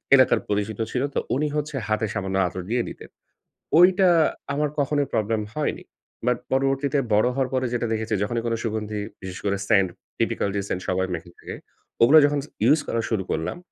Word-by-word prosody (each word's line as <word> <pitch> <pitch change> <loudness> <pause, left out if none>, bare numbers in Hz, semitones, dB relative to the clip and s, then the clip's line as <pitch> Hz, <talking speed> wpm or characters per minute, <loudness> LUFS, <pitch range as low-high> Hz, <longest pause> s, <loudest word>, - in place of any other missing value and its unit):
এলাকার 130 - +5
পরিচিত 105 +1 -1
ছিল 125 +1 0
তো, - - +1 0.2
উনি 150 +2 +1
হচ্ছে 150 0 -2
হাতে 110 +1 0
সামান্য 95 0 -3
আতর 90 +1 -5
দিয়ে 120 +1 +1
দিতেন। - - -11 0.7
ওইটা 185 +1 +6 0.5
আমার 150 +1 0
কখনোই 145 0 +1
প্রবলেম 110 0 0
হয়নি। 150 -1 -2 0.4
বাট 125 - +3
পরবর্তীতে 135 +2 +1 0.2
বড় 110 +4 +4
হওয়ার 130 -2 0
পরে 130 0 +1
যেটা 120 -1 0
দেখেছি, 110 0 -2
যখনই 115 +2 -1
কোনো 115 -1 0
সুগন্ধি, 105 -1 -3 0.2
বিশেষ 95 -1 -7
করে 100 0 +1
সেন্ট, 100 -3 +5 0.3
টিপিক্যাল 100 - 0 0.2
সেন্ট 90 - -2
সবাই 95 0 +1
মেখে 85 +1 -6
থাকে, - - -8 0.5
ওগুলা 145 +7 +8
যখন 145 0 +1 0.2
ইউজ 155 +1 +5
করা 115 - 0
শুরু 100 -4 0
করলাম, 80 - -2
115 Hz, 175 wpm, -24 LUFS, 105-140 Hz, 0.7 s, ওগুলা